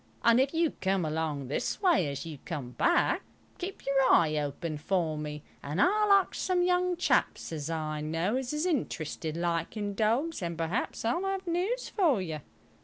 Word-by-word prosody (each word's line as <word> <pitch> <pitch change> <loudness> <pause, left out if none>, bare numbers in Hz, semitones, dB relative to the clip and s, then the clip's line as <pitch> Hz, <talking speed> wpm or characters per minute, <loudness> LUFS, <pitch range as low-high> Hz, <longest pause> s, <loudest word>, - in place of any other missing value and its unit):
And 235 +1 +6
if 265 +1 +3
you 330 -1 +2
come 190 -2 +1
along 155 -3 -2
this 140 - -2
way 345 - +3
as 140 +1 -4
you 155 -4 -7
come 150 -10 -5
back, 345 - +2 0.4
keep 380 +2 -6
your 275 0 +3
eye 155 -2 +4
open 150 +1 -3
for 165 -1 0
me, 150 -1 -5 0.2
and 150 +5 -4
I'll 420 - +4
arks 395 -2 +4
some 365 -1 +1
young 360 0 +2
chaps 350 - +1
as 155 -1 -4
I 155 -2 -2
know 165 +8 -1
as 260 -1 -2
is 300 +3 -1
interested 165 - -2
like 170 +4 -1
in 205 -1 -2
dogs, 230 +9 0
and 170 -2 -3
perhaps 170 +8 -2
I'll 245 +11 +1
have 390 -1 -2
news 370 +9 -1
for 325 - +2
you." 160 -5 -4
195 Hz, 180 wpm, -29 LUFS, -, 0.4 s, And